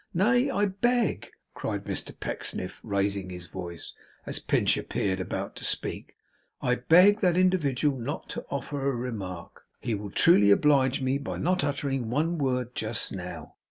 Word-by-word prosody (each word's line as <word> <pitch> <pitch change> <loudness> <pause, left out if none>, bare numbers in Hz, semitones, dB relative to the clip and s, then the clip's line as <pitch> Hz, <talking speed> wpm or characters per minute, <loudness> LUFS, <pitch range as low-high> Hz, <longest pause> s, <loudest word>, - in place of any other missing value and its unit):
Nay! 240 +9 +3
I 205 -6 +1
beg,' 230 +4 0 0.2
cried - - -3
Mr - - -3
Pecksniff, 90 - -3
raising 100 -2 -1
his 90 -1 -8
voice, 85 -2 -7 0.3
as - - -2
Pinch - - +2
appeared 95 -2 -2
about 95 - -4
to - - -8
speak, - - -2 0.4
'I 125 - +1
beg 190 +5 +7
that 180 -4 +2
individual 150 -7 +2
not 140 +6 -4
to - - -5
offer 140 0 -2
a 135 - -1
remark; 100 -8 -6 0.2
he 115 - -2
will 105 -1 -4
truly 105 - +5
oblige 135 +3 +4
me 130 +2 +1
by 140 - -5
not 180 +2 +1
uttering 135 -4 -1
one 160 +6 0
word, 125 -3 -1
just - - -1
now. - - -7
135 Hz, 160 wpm, -27 LUFS, 105-175 Hz, 0.4 s, beg